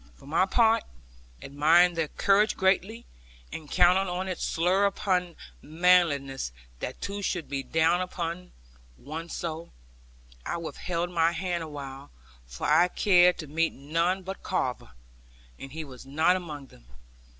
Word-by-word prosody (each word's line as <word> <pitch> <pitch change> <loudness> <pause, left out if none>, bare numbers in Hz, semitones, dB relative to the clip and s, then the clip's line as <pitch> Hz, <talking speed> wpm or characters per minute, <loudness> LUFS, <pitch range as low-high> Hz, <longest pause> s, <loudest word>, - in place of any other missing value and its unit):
For - - -18
my 165 +6 +1
part, 225 +2 +3 0.6
admiring 160 +5 +4
their 165 -2 -1
courage 200 +6 +2
greatly, 195 +5 +1 0.5
and 155 -2 -8
counting 185 +1 +2
it 185 - -4
slur 180 +4 +1
upon 180 -3 -1 0.3
manliness 155 - +2 0.3
that 130 - -6
two 200 0 -4
should 175 -4 -2
be 140 -1 -3
down 160 +5 +2
upon 180 0 -5 0.5
one 160 - -7
so, 165 0 -5 0.7
I - - -3
withheld 170 +1 -4
my 165 -1 +2
hand 175 0 -2
awhile; 140 -3 -8 0.4
for - - -6
I 175 - +5
cared 180 -1 +4
to 160 - -6
meet 165 +3 0
none 165 +7 -1
but 190 +1 -7
Carver; 125 - -3 0.7
and 135 - -9
he 160 +2 -5
was 130 -4 -11
not 160 +6 +2
among 155 -6 -6
them. - - -20
170 Hz, 140 wpm, -27 LUFS, 150-180 Hz, 0.7 s, I